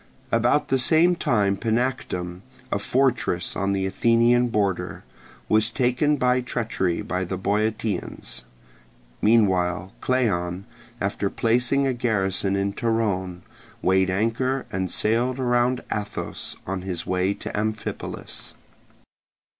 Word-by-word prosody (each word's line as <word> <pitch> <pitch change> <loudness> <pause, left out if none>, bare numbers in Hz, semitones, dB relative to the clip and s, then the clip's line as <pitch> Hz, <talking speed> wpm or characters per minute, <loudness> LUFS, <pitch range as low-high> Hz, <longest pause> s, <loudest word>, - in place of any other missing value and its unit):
About 120 +5 +2
the 135 - +2
same 165 +7 +4
time 105 -12 +1
Panactum, 105 -6 -2 0.3
a - - +1
fortress 125 -9 0
on 100 0 0
the 95 -1 0
Athenian 115 +5 +3
border, 100 -5 -1 0.4
was 110 +1 +3
taken 125 +5 +1
by 125 -1 +2
treachery 110 -8 -1
by 90 +1 -2
the 95 +1 -3
Boeotians. 105 - -2 0.8
Meanwhile 95 -4 +2
Cleon, 95 -8 0 0.3
after 100 0 -1
placing 125 +6 +1
a 135 - +1
garrison 100 -5 0
in 100 0 0
Torone, 100 -6 -1 0.4
weighed 95 0 +3
anchor 115 +7 0
and 95 -1 -2
sailed 120 +4 +1
around 125 0 +1
Athos 105 -1 -5
on 95 0 -3
his 90 -3 -4
way 95 +2 0
to - - -6
Amphipolis. 110 +1 -4
110 Hz, 115 wpm, -24 LUFS, 95-120 Hz, 0.8 s, same